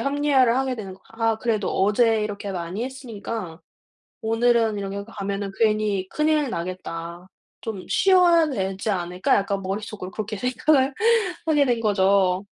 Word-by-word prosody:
합리화를 275 -2 +2
하게 265 -1 0
되는 200 -5 -7
거 190 - -21
'아 225 -1 0
그래도 220 -4 -1
어제 215 +3 +2
이렇게 205 -1 -5
많이 185 +4 -4
했으니까 225 -9 -6 0.6
오늘은 225 -1 +2
이렇게 200 0 -4
가면은 200 -2 -4
괜히 210 -3 +1
큰일 300 -2 +1
나겠다. 170 -1 -6 0.3
좀 210 -5 -6
쉬어야 355 -4 +4
되지 195 -4 -3
않을까?' 180 -2 0
약간 200 0 0
머릿속으로 195 0 -5
그렇게 215 +1 -5
생각을 260 +4 +2 0.6
하게 295 -3 +4
된 240 -3 +1
거죠. 195 -2 +2
215 Hz, 320 characters per minute, -23 LUFS, 195-245 Hz, 0.6 s, 쉬어야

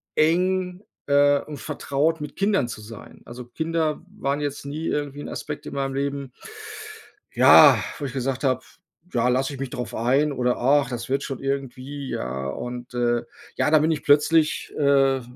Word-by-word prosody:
eng, 180 +3 +1 0.3
äh, 145 0 +4
und 150 -2 -8
vertraut 150 +2 -1
mit 150 - -7
Kindern 195 - +1
zu 110 - -7
sein. 110 0 -12
Also, 120 +1 -9
Kinder 160 +4 -2
waren 145 -6 -2
jetzt 145 -1 -4
nie 155 +3 -4
irgendwie 145 -1 -3
'n - - -7
Aspekt 150 -1 -6
in - - -7
meinem 135 -1 -2
Leben, 140 -2 -3 1.0
ja, - - +8 0.2
wo - - -6
ich 130 - -4
gesagt 135 +1 -2
habe: 130 -1 +1 0.5
„Ja, 120 0 +2
lass 130 +2 +1
ich 135 - -7
mich 135 -2 -4
drauf 125 -7 -5
ein 135 +6 +2
oder 125 -1 0
ach, 135 +1 +3
das 120 -1 -5
wird 135 - 0
schon 135 - -5
irgendwie“, 135 0 -4
ja 65 +2 -3
und, 125 - -6
äh, 120 -1 +1 0.3
ja, 150 - +2
da 155 - +6
bin 155 +2 +2
ich 150 - -2
plötzlich, 155 +2 +3
äh, 135 -2 +3
140 Hz, 175 wpm, -24 LUFS, 125-150 Hz, 1.0 s, ja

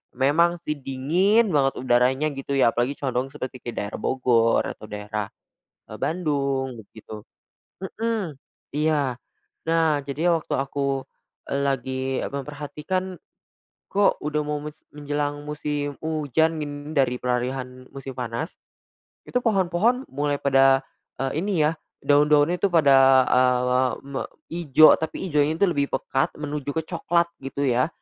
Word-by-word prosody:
memang 155 +7 +3
sih 150 - -2
dingin 175 - +2
banget 135 -2 +2
udaranya 130 +3 +2
gitu 135 +1 -6
ya, 130 -4 +4
apalagi 120 +4 -1
condong 130 -1 -1
seperti 130 -3 -6
kayak 120 - -6
daerah 100 - -6
Bogor 120 -3 +2
atau 110 - -8
daerah, 105 0 -4 0.6
eee, - - -8
Bandung 140 -6 -1
begitu 110 0 -11 0.6
mhm, 220 -3 -2 0.4
iya. 145 -3 +1 0.5
Nah, 160 -3 +3
jadi 155 +5 0
waktu 165 -2 -1
aku, 135 0 -1 0.4
e - - -2
lagi 130 -1 -1 0.3
memperhatikan, 150 +6 -4 0.8
kok 200 0 +3
udah 150 0 0
mau 150 0 -1
mes 150 0 -8 0.2
menjelang 145 0 -3
musim 145 -1 -3
hujan 160 +1 +1
in 145 0 -7
dari 130 -3 +2
peralihan 125 +1 -2
musim 135 -1 -7
panas, 125 +6 -4 0.7
itu 250 - +1
pohon-pohon 215 +3 +2
mulai 145 +1 -1
pada, 135 -1 +5 0.4
eee, 135 +2 -1
ini 195 -5 +1
ya, 155 - +2 0.3
daun-daun 145 +2 +4
itu 190 +2 +1
pada, 135 -5 +6
eee, 125 0 +3 0.2
me 140 -1 -4 0.3
ijo, 155 -3 +6
tapi 160 +4 -4
ijonya 150 +1 +2
itu - - +4
lebih 140 -4 0
pekat 135 - 0
menuju 145 -1 -4
ke 160 - +1
coklat 170 0 +1 0.2
gitu 135 +1 -3
ya. 125 +2 +2
145 Hz, 135 wpm, -24 LUFS, 130-155 Hz, 0.8 s, pada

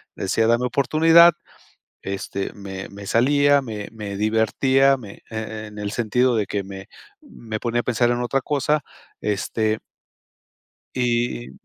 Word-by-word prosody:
decía: 110 +4 0
"Dame 120 +2 +2
oportunidad". 160 +7 +5 0.7
Este, 100 0 -4
me 95 -2 -7
me 100 0 -10
salía, 145 +5 +4
me 110 -5 -6
me 105 -3 -6
divertía, 130 +6 +3
me 105 -6 -12
e 110 -1 -5
en 105 0 -10
el 100 -1 -3
sentido 120 +3 +1
de 105 -2 +1
que 100 -1 -2
me 95 0 -9 0.3
me 115 - -7
ponía 120 +1 -1
a - - -19
pensar 120 0 +1
en 120 0 -1
otra 135 +3 0
cosa, 150 +2 0 0.4
este 110 +1 -1 1.2
y, 120 - -1
115 Hz, 140 wpm, -22 LUFS, 105-130 Hz, 1.2 s, oportunidad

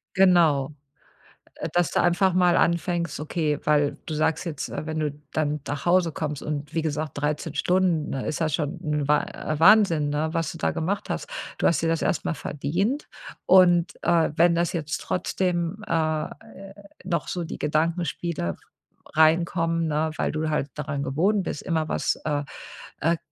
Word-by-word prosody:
Genau. 165 -7 +4 0.8
Äh, - - -5
dass 175 -2 +2
du - - +2
einfach 175 +2 +3
mal 180 -1 +4
anfängst 170 0 0
okay, 150 -1 -1
weil 145 -1 +2
du 160 - -4
sagst 155 +3 0
jetzt, 155 -5 -4
äh, - - -5
wenn 155 0 -3
du 150 -1 0 0.2
dann 150 -1 0
nach 145 0 -4
Hause 175 -1 +3
kommst 150 -2 -4
und 150 0 -4
wie 165 - 0
gesagt, 155 -1 -2
13 150 +1 -2
Stunden, 180 -1 +1
ne, 135 - -3
ist 155 - -2
ja 165 -2 +1
schon 155 +3 -2
'n 150 -2 -1
Wa 150 0 +3 0.3
Wahnsinn, 170 -5 +5
ne, 150 +2 -1
was 165 -3 -1
du - - -9
da - - 0
gemacht 190 +5 -2
hast. - - -3 0.3
Du - - +2
hast 165 - +2
dir 165 - +1
das 165 0 0
erst - - 0
mal 175 - 0
verdient 175 - -2 0.4
und, 180 -2 +5
äh, 170 -3 +3
wenn 170 +1 +4
das 170 0 0
jetzt 155 -2 -3
trotzdem 180 +1 -1
äh, 155 -1 0 0.7
noch 180 -2 -2
so 175 -2 -3
die - - -6
Gedankenspiele 155 - -1 0.6
reinkommen, 165 +1 +3
ne, 155 +1 0
weil - - 0
du 155 0 -2
halt 150 -2 -1
daran 145 -1 -3
gewohnt 185 +9 +1
bist, 150 - -4
immer 160 -2 -1
was, - - 0
äh 145 -1 0 0.6
äh, 165 +2 +2
160 Hz, 170 wpm, -25 LUFS, 150-175 Hz, 0.8 s, Wahnsinn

